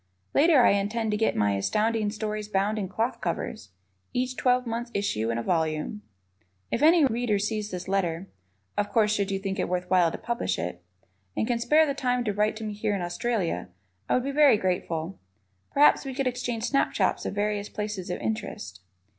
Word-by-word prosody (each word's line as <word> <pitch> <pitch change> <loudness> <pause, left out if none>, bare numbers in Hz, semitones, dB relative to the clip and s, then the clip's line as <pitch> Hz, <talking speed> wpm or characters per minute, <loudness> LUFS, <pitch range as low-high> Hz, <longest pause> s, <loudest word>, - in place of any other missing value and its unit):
Later 295 -3 +5
I - - +6
intend 210 +3 0
to - - +1
get 220 - +1
my 105 -1 +2
Astounding 210 - +1
Stories 210 0 -4
bound 210 +1 0
in 190 -3 -3
cloth 230 +4 -2
covers, 170 - -3 0.4
each 255 +1 -1
twelve 250 0 +2
months' 235 +1 -3
issue 115 - 0
in 115 - -1
a 115 - -2
volume. 160 - -1 0.7
If - - -1
any 320 0 +6
Reader 235 -4 +1
sees 210 +1 -2
this 180 -2 -6
letter 190 -2 -1 0.5
of 205 0 0
course, 210 -1 +3
should 200 -1 0
you 195 - 0
think 195 0 -4
it - - -1
worth 180 0 -1
while 175 -3 +4
to - - -5
publish 235 0 -2
it 90 +1 -5 0.5
and - - +1
can 235 0 0
spare 305 +6 +4
the 280 - -1
time 250 -3 0
to 210 -3 -1
write 210 +2 +1
to 220 - -7
me 215 -1 -3
here 210 0 -1
in 195 - -3
Australia, 175 - -2 0.4
I - - +3
would 250 - +1
be 275 - -2
very 285 -5 +6
grateful. 180 -2 -2 0.5
Perhaps 290 +1 +5
we 270 -2 -6
could 275 0 -1
exchange 245 -2 -2
snapshots 275 +3 +1
of - - -4
various 205 0 -1
places 210 -4 -4
of 180 - -3
interest. 110 -4 -4
210 Hz, 195 wpm, -27 LUFS, 185-240 Hz, 0.7 s, I